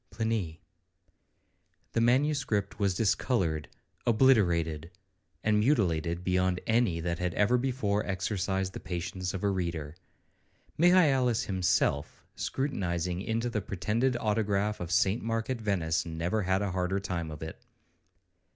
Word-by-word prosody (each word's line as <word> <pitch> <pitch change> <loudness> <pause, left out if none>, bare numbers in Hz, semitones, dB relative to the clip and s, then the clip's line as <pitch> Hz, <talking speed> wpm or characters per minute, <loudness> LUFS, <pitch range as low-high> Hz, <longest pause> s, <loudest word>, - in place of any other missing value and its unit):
PLINY 105 -7 -2 1.3
The 115 - +1
manuscript 125 -5 +1
was 100 -3 +1
discoloured, 90 - 0 0.4
obliterated, 85 - +3 0.5
and 105 -1 +3
mutilated 90 - +1
beyond 90 0 +1
any 110 -7 +2
that 85 0 -2
had 90 -1 -2
ever 105 +4 +3
before 120 -5 0
exercised 95 0 -1
the - - -6
patience 90 +1 -4
of 95 - -5
a 100 - +3
reader. 85 -5 -3 0.8
Michaelis 145 -9 +4
himself, 90 -6 0
scrutinizing 90 - -2
into 115 +3 -1
the 110 -3 -2
pretended 115 +7 0
autograph 105 -2 0
of 90 - -5
St 95 +5 +2
Mark 115 +2 -2
at 120 -3 -3
Venice, 90 -6 0
never 85 +5 -2
had 95 +1 +1
a 100 - -1
harder 90 +1 0
time 90 -4 -3
of 75 0 -7
it. 80 - -8
95 Hz, 125 wpm, -29 LUFS, 90-115 Hz, 1.3 s, Michaelis